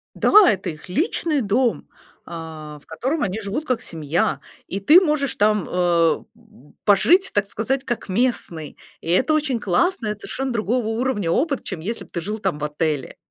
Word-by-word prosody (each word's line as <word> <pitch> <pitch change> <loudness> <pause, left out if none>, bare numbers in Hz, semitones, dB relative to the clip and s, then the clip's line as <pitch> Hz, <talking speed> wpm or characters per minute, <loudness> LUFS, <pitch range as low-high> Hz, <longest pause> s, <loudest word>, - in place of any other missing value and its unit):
Да, - - +1 0.2
это 195 -4 -2
их 155 +2 -11
личный 310 - 0
дом, 235 +2 0 0.4
а, 160 -3 -8
в - - -28
котором 265 - -2
они 200 +3 -3
живут 220 +9 -4
как 255 -4 -1
семья. 160 0 -1 0.3
И 195 - -3
ты 310 - +7
можешь 300 -6 0
там, 210 -1 +2
э, 170 -2 +2 0.6
пожить, 345 - +4
так 205 -1 +1
сказать, 260 +6 -2
как 240 -4 -4
местный. 185 - -1 0.2
И 165 - -5
это 260 - +3
очень 285 -6 0
классно, 220 - 0
это 210 0 -3
совершенно 265 0 -3
другого 230 +1 -1
уровня 225 -6 -1
опыт, 280 - 0
чем 185 -5 -5
если 225 +7 -4
бы - - -23
ты 170 - -3
жил 210 +5 -4
там 190 -8 -2
в 150 - -3
отеле. 150 -2 -2
210 Hz, 175 wpm, -22 LUFS, 170-260 Hz, 0.6 s, ты